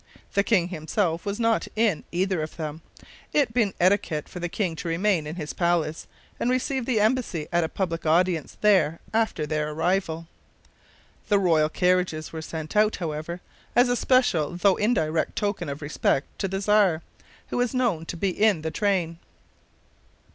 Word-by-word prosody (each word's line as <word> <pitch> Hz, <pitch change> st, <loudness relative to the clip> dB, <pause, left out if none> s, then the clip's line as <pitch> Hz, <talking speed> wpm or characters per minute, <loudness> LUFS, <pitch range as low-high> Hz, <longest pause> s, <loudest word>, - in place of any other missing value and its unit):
The 200 Hz, -, +3 dB
king 185 Hz, -5 st, +2 dB
himself 170 Hz, +2 st, -1 dB
was 200 Hz, +2 st, -2 dB
not 230 Hz, -1 st, +1 dB
in 215 Hz, -7 st, +1 dB
either 185 Hz, -1 st, 0 dB
of 155 Hz, -, -6 dB
them, 155 Hz, -1 st, -5 dB, 0.5 s
it 275 Hz, -6 st, +2 dB
being 220 Hz, -5 st, +1 dB
etiquette 175 Hz, -5 st, +2 dB
for 180 Hz, -, -8 dB
the 175 Hz, 0 st, -3 dB
king 180 Hz, -3 st, -2 dB
to 175 Hz, -, -5 dB
remain 165 Hz, -1 st, +1 dB
in 155 Hz, -, -5 dB
his 155 Hz, -4 st, -5 dB
palace, 170 Hz, -3 st, 0 dB, 0.3 s
and 240 Hz, -, 0 dB
receive 255 Hz, 0 st, -1 dB
the 240 Hz, -5 st, +2 dB
embassy 215 Hz, -8 st, 0 dB
at 175 Hz, -1 st, +2 dB
a 160 Hz, -, -2 dB
public 170 Hz, -4 st, -3 dB
audience 165 Hz, 0 st, +1 dB
there 190 Hz, -6 st, +3 dB
after 220 Hz, -8 st, +1 dB
their 150 Hz, 0 st, -1 dB
arrival. 165 Hz, +1 st, -1 dB, 1.0 s
The 205 Hz, -, +4 dB
royal 165 Hz, -5 st, +3 dB
carriages 180 Hz, -2 st, 0 dB
were 160 Hz, -, -4 dB
sent 160 Hz, +1 st, -6 dB
out, 215 Hz, +1 st, +4 dB
however, 165 Hz, +1 st, -4 dB, 0.3 s
as 245 Hz, +1 st, +5 dB
a 245 Hz, -, +2 dB
special 235 Hz, -, +2 dB
though 185 Hz, +2 st, +3 dB
indirect 165 Hz, -8 st, 0 dB
token 200 Hz, -6 st, -2 dB
of 140 Hz, +2 st, -6 dB
respect 145 Hz, -1 st, 0 dB
to 195 Hz, -, 0 dB
the 195 Hz, +1 st, -3 dB
Czar, 200 Hz, -5 st, +3 dB, 0.5 s
who -, -, -3 dB
was 245 Hz, +1 st, 0 dB
known 215 Hz, -11 st, 0 dB
to 170 Hz, -, -5 dB
be 190 Hz, +3 st, 0 dB
in 205 Hz, -4 st, +2 dB
the 160 Hz, -, -2 dB
train. 180 Hz, -5 st, 0 dB
180 Hz, 170 wpm, -25 LUFS, 160-210 Hz, 1.0 s, as